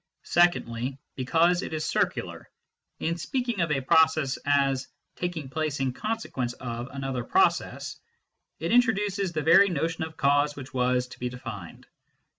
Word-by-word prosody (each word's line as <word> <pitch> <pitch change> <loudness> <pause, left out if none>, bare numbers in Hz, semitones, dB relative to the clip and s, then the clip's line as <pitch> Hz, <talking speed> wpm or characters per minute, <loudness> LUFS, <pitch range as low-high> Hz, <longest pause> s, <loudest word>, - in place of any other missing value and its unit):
Secondly, 130 -7 +1 0.2
because 165 +7 +2
it - - -6
is 155 -1 -2
circular: - - -2 0.5
in 165 +1 -2
speaking 240 +3 -2
of 170 -2 0
a 135 -2 +1
process 155 0 +3
as 135 -2 +2
" - - -53
taking 175 -5 -3
place 150 +1 -2
in 130 -2 0
consequence 210 - -3
of 120 -1 -5
" - - -15
another 135 -2 -3
process, 385 - +1 0.6
it - - -2
introduces 205 -5 +2
the 155 -2 -2
very 180 +6 +6
notion 165 0 -1
of 160 0 -7
cause 145 +1 +2
which 135 -1 -9
was 125 0 +1
to 125 - -13
be 125 - -2
denned. 120 -8 -8
150 Hz, 155 wpm, -27 LUFS, 130-175 Hz, 0.6 s, very